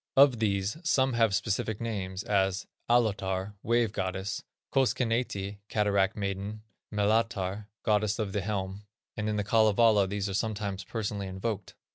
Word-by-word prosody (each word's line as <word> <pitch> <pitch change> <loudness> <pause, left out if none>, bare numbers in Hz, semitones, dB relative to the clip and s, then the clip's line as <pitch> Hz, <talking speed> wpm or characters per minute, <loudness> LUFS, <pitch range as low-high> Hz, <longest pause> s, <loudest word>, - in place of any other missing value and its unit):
Of 135 -4 +7
these, 100 +1 0
some 135 -6 +3
have 115 -4 +3
specific 105 +1 -1
names; 95 -4 -3
as 95 -2 +1 0.2
Allotar 100 -4 +1
(wave 115 -2 +2
goddess), 95 -1 -3 0.3
Koskenneiti 115 -5 0
(cataract 100 -1 +2
maiden), 100 +1 -3 0.3
Melatar 105 -1 0 0.2
(goddess 105 -1 +2
of 105 -3 -2
the 105 - 0
helm), 100 0 -3 0.3
and 110 0 -2
in 105 - 0
The 105 - 0
Kalevala 110 -1 +4
these 100 0 -2
are 100 - -3
sometimes 100 -2 -2
personally 100 -3 -3
invoked. 95 +1 -4
105 Hz, 135 wpm, -29 LUFS, 95-110 Hz, 0.3 s, Of